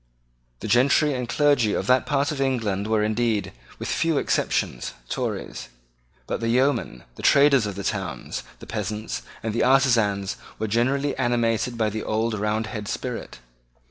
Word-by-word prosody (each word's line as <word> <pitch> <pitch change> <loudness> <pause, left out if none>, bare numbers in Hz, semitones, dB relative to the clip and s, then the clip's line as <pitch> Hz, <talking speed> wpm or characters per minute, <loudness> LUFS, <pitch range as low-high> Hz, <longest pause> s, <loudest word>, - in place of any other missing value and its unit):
The - - -4
gentry 135 +6 +4
and 125 -2 -3
clergy 140 -8 +3
of - - -1
that 125 0 +3
part 145 +1 +1
of 140 -2 -3
England 110 -7 0
were 110 -1 +2
indeed, 110 0 0 0.3
with - - -5
few 165 -2 +1
exceptions, - - 0 0.2
Tories. - - -4 0.6
But - - -3
the 115 0 -1
yeomen, 125 - +1
the - - -8
traders 140 -5 +5
of 100 - -5
the 100 - -5
towns, 95 -4 -3 0.2
the - - -12
peasants, 105 0 -4 0.2
and 110 -1 -2
the 115 - +1
artisans 115 -7 +3 0.2
were 110 - -2
generally 135 +6 +1
animated 120 -1 0
by 110 -2 +1
the 110 +1 -3
old 110 +2 -1
Roundhead 105 0 -2
spirit. - - -5
115 Hz, 155 wpm, -24 LUFS, 105-130 Hz, 0.6 s, traders